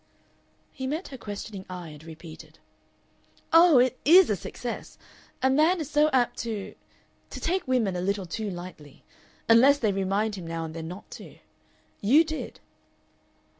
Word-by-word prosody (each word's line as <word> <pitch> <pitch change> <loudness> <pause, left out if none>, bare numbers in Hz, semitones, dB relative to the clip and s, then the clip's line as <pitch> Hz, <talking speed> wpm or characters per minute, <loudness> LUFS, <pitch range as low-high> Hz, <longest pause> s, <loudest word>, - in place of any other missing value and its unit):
He 260 -2 -5
met 310 +7 -4
her 265 - -8
questioning 205 -2 -7
eye, 180 -2 -7
and 150 0 -13
repeated, 160 0 -12 1.0
"Oh! 330 -3 +7
it 255 +1 +3
IS 350 - +7
a - - +2
success. 235 +6 -7 0.5
A 265 - +4
man 315 +6 +3
is 310 -2 -5
so 300 +1 +4
apt 245 -2 +1
to 220 -4 -5 0.6
to - - -7
take 365 -1 -1
women 235 -7 +1
a 180 - -2
little 195 +1 -1
too 210 +5 -4
lightly. 175 -5 -10 0.4
Unless 255 +5 +6
they 220 -7 +1
remind 195 +3 -1
him 185 -4 -7
now 165 0 -4
and 160 - -8
then 160 -1 -6
not 180 +5 -10
to.... - - -11 0.6
YOU 270 +11 +5
did." 315 -1 -6
220 Hz, 160 wpm, -26 LUFS, 180-280 Hz, 1.0 s, Oh